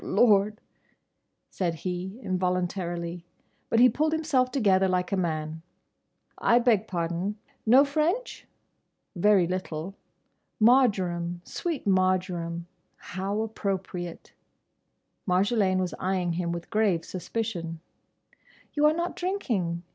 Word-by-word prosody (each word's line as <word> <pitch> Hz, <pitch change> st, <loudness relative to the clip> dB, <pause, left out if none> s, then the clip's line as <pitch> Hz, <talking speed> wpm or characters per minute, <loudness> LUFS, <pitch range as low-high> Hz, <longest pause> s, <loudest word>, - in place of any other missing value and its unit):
"Oh -, -, -10 dB
Lord!" 210 Hz, -2 st, +4 dB, 0.9 s
said 175 Hz, -3 st, -1 dB
he 185 Hz, +4 st, -4 dB
involuntarily. 180 Hz, -2 st, -2 dB, 0.5 s
But 230 Hz, -, +3 dB
he 250 Hz, -, +8 dB
pulled 310 Hz, +6 st, +1 dB
himself 300 Hz, -6 st, +1 dB
together 195 Hz, -7 st, +3 dB
like 180 Hz, 0 st, 0 dB
a -, -, +2 dB
man. 160 Hz, -3 st, -2 dB, 0.8 s
"I 235 Hz, -, +4 dB
beg 230 Hz, -4 st, +3 dB
pardon!—Know 205 Hz, +10 st, +1 dB
French? 315 Hz, -, -1 dB, 0.7 s
Very 195 Hz, 0 st, +4 dB
little. 180 Hz, -1 st, -4 dB, 0.7 s
Marjoram—sweet 200 Hz, -, +1 dB
Marjoram—how 185 Hz, +1 st, -2 dB
appropriate!" 190 Hz, -5 st, -4 dB, 0.9 s
Marjolaine 190 Hz, +1 st, +2 dB
was 185 Hz, -1 st, -1 dB
eyeing 185 Hz, -2 st, 0 dB
him 170 Hz, 0 st, -2 dB
with 170 Hz, 0 st, -6 dB
grave 205 Hz, -6 st, +2 dB
suspicion. 180 Hz, -4 st, -4 dB, 0.9 s
"You 295 Hz, 0 st, +4 dB
are 305 Hz, -, +4 dB
not 345 Hz, +1 st, -2 dB
drinking. 210 Hz, -, -2 dB
190 Hz, 100 wpm, -27 LUFS, 175-225 Hz, 0.9 s, he